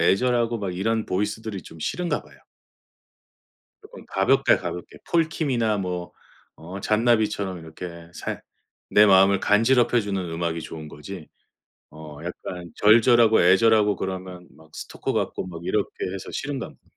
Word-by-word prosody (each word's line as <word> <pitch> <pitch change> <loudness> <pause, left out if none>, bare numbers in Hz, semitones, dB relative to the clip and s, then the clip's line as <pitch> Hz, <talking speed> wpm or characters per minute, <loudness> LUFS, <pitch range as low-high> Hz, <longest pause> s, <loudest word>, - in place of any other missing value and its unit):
애절하고 120 +5 +2
막 95 -4 -4
이런 110 +3 0
보이스들이 105 0 -3
좀 80 - -13
싫은가 175 - -2
봐요. - - -19 1.5
쪼끔 470 +4 -13
가볍게, - - +3
가볍게 - - -7
폴 165 -2 +2
킴이나 120 -10 0
뭐 90 -2 -4 0.4
어 90 +5 -8
잔나비처럼 105 -4 +1
이렇게 85 +1 -9
살 - - -5 0.5
내 105 +1 +7
마음을 95 0 +6
간지럽혀 120 +3 +3
주는 100 -3 -2
음악이 85 0 -2
좋은 80 -1 -8
거지 80 +3 -9 0.6
어 75 -1 -11
약간 90 -2 -7
절절하고 115 +1 +5
애절하고 105 +3 +4
그러면 95 -1 -6
막 80 0 -19
스토커 - - -5
같고 - - -2
막 85 -3 -8
이렇게 100 +3 0 0.2
해서 95 - -7
싫은 140 -1 -3
가봅니다. 125 - -9
100 Hz, 320 characters per minute, -24 LUFS, 90-115 Hz, 1.5 s, 내